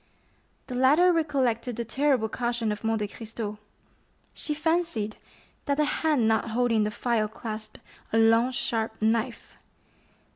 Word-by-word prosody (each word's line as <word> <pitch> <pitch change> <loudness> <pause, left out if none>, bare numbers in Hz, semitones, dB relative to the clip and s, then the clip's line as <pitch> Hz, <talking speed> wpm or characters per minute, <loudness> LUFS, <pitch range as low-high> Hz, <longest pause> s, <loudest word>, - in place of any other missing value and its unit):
The 255 - -7
latter 295 +8 +5
recollected 255 -7 0
the 235 +1 -3
terrible 265 -1 +1
caution 235 -1 -1
of 210 +1 -5
Monte 220 -2 0
Cristo; 215 -1 -6 0.7
she 300 - -4
fancied 320 -9 0 0.5
that 280 0 0
the 300 - +3
hand 295 -6 +1
not 220 +1 +1
holding 230 -2 +2
the - - 0
phial 220 0 0
clasped 215 0 -7 0.3
a 225 - +2
long 225 +2 +5
sharp 225 -3 -2
knife. 225 +2 -1
230 Hz, 135 wpm, -27 LUFS, 220-265 Hz, 0.7 s, latter